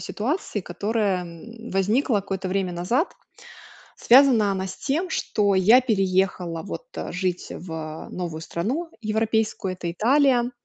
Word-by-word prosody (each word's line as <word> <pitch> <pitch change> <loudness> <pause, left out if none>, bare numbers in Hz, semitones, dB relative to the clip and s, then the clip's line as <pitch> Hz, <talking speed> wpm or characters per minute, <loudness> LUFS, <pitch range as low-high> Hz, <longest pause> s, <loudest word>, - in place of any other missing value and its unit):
ситуации, 240 - -3
которая, 200 +1 -1
м, 225 +8 -10
возникла 210 +6 +1
какое-то 195 -1 -3
время 190 -1 -1
назад. 190 - 0 0.8
Связана 245 -5 +5
она 190 0 -2
с - - -7
тем, 325 +7 -2
что 205 -2 +1
я 205 +7 +6
переехала, 190 -7 0
вот, 345 - -7
э, - - -5
жить 180 -1 -2
в 160 -2 -7
новую 170 -3 -5
страну 250 - -3
европейскую- 220 -3 0
это 180 -1 -5
Италия. 245 +4 +3
200 Hz, 130 wpm, -24 LUFS, 180-235 Hz, 0.8 s, я